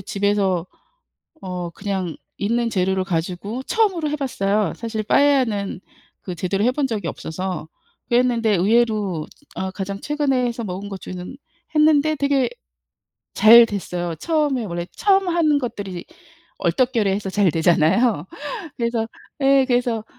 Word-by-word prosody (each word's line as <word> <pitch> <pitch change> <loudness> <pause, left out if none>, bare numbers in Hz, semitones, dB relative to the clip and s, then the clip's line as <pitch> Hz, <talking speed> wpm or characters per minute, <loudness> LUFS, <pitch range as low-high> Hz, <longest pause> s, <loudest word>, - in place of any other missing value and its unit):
집에서 195 -2 0 0.7
어 180 -2 -5
그냥 190 -3 -4 0.2
있는 230 +3 0
재료를 190 -1 +1
가지고 185 +7 -3
처음으로 380 -8 +1
해 - - -1
봤어요. 210 -7 0
사실 225 -2 -4
빠에야는 235 -7 +2 0.4
그 180 - -6
제대로 195 +4 -1
해 245 - +4
본 280 0 0
적이 220 -5 -3
없어서 180 0 -5 0.4
그랬는데 240 -2 +2
의외로 205 -4 +1 0.3
아 190 0 -2
가장 195 0 -5
최근에 280 -3 0
해서 235 0 -3
먹은 195 +1 -5
것 195 -2 -7
중에는 180 +7 -7 0.4
했는데 305 0 +4
되게 280 -2 +1 0.9
잘 235 +2 +9
됐어요. 175 -5 -4
처음에 295 - 0
원래 175 -3 -4
처음 390 -2 +3
하는 325 -4 +3
것들이 200 -8 -5 0.6
얼떨결에 245 -6 +1
해서 200 -1 -3
잘 200 -3 +3
되잖아요. 170 +4 +2 0.5
그래서 235 -1 -1 0.3
예 270 0 +5
그래서 245 -3 +1
215 Hz, 295 characters per minute, -21 LUFS, 190-255 Hz, 0.9 s, 잘